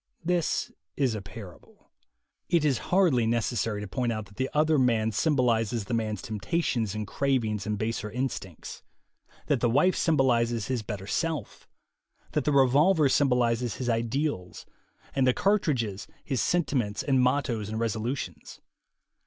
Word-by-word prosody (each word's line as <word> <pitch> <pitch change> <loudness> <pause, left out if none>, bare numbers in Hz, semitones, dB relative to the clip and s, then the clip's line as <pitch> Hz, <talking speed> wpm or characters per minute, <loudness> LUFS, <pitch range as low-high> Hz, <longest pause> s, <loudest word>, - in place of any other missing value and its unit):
This 175 -2 0 0.3
is 130 -5 +2
a 105 - -4
parable. 95 -1 -13 0.6
It 170 -3 +3
is 135 -6 +2
hardly 165 -12 +3
necessary 115 -2 0
to 105 - -5
point 125 +3 -1
out 110 -2 -3
that 100 0 -19
the 130 0 -1
other 155 0 +3
man 115 -3 +2
symbolizes 115 -4 +1
the 125 - -4
man's 110 -2 -2
temp 110 -2 -5
tations 120 - -1
and 105 0 -3
cravings 110 -5 -1
and 105 -1 -1
baser 110 0 -2
instincts, 115 - -5 0.6
that 145 -4 +1
the 120 - +2
wife 150 +10 +3
symbolizes 120 - +1
his 125 -3 0
better 105 -3 -6
self, 155 - -3 0.6
that 150 - -1
the 150 - +2
revolver 145 +4 +4
symbolizes 125 -4 +2
his 125 -2 -3
ideals, 115 - -2 0.5
and 135 -2 +2
the 125 - +3
cartridges 135 - 0 0.2
his 135 -4 -1
senti 175 -4 0
ments 105 -5 -1
and 135 -3 +2
mottoes 125 -5 0
and 110 +1 -3
resolutions. 115 +3 -4
120 Hz, 150 wpm, -27 LUFS, 110-140 Hz, 0.6 s, revolver